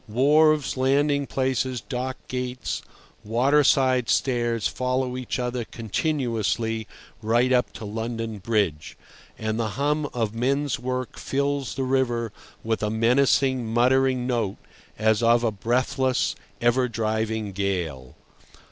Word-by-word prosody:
Wharves, 150 +5 +3
landing 140 +2 +2
places, 130 -1 -1
dock 130 +2 -4
gates, 125 0 -3 0.4
waterside 130 +1 +3
stairs, 120 -4 +1
follow 125 0 -1
each 130 -1 -3
other 125 -1 -2
continuously 115 -3 -1 0.3
right 120 +4 +2
up 125 -1 +2
to 110 - -8
London 115 0 -4
Bridge, 100 -8 -1 0.4
and 110 +1 -2
the 110 0 -2
hum 145 +1 0
of 115 -3 -2
men's 135 +4 0
work 125 0 -4
fills 140 0 -1
the 135 - -1
river 125 -4 0 0.3
with 110 0 -1
a 105 - 0
menacing, 125 +2 +2
muttering 130 +1 +3
note 115 -6 -1 0.4
as 110 0 +2
of 120 0 +4
a 115 - +2
breathless, 125 +4 0 0.2
ever 120 +2 +2
driving 110 -2 -2
gale. 90 -10 -3
125 Hz, 120 wpm, -25 LUFS, 110-130 Hz, 0.4 s, of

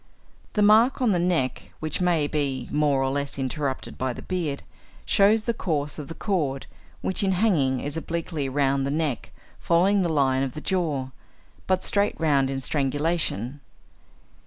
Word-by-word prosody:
The 210 - +2
mark 220 +5 +5
on 250 -4 +3
the 180 - +2
neck, 170 -7 -1
which 155 +2 -3
may 170 -4 +2
be 140 -4 -2
more 145 -3 +2
or 135 - 0
less 140 0 -3
interrupted 135 0 -3
by 130 -1 -1
the - - -9
beard, 165 -7 -3 0.4
shows 210 +2 +4
the 235 - 0
course 150 -9 -2
of 145 - -6
the 165 - -7
cord, 150 -10 -1 0.4
which 190 - -1
in 195 -1 +2
hanging 165 - +2
is 145 +1 -4
obliquely 160 -3 -3
round 135 0 +1
the 135 - -1
neck 150 -4 -2 0.3
following 190 +4 +3
the 175 - +1
line 135 -4 +2
of 135 -2 -2
the - - -4
jaw, 155 -7 -1 0.6
but 185 0 +1
straight 205 +1 0
round 140 -4 +2
in 135 0 -3
strangulation. 145 - -1
150 Hz, 165 wpm, -25 LUFS, 135-180 Hz, 0.6 s, mark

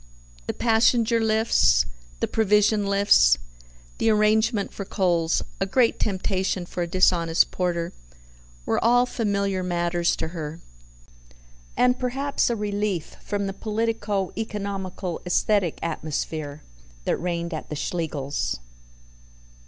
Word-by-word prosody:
The - - -2
passenger 230 0 +3
lifts, 220 - +3 0.4
the - - +1
provision 210 -1 +2
lifts, 200 - +5 0.6
the 225 - +3
arrangement 215 0 +2
for 200 - -5
coals 175 -4 +1 0.2
(a 195 - 0
great 235 +3 +2
temptation 190 -2 -1
for 175 - -5
a 170 - -1
dishonest 170 -2 +3
porter), 175 -2 -2 0.7
were - - 0
all 245 +2 +5
familiar 200 -5 -1
matters 175 -1 0
to 160 - -4
her, 160 -1 -6 1.2
and 250 0 +3
perhaps 270 +3 0
a 235 - 0
relief 205 -5 -2
from 205 -1 -2
the 195 - -3
politico 210 -2 -2
economical 195 -5 -4
aesthetic 180 0 +1
atmosphere 155 -2 -4 0.4
that - - +1
reigned 170 -1 -3
at 155 - -6
the 150 - -4
Schlegels'. 145 - -3
195 Hz, 115 wpm, -24 LUFS, 170-220 Hz, 1.2 s, lifts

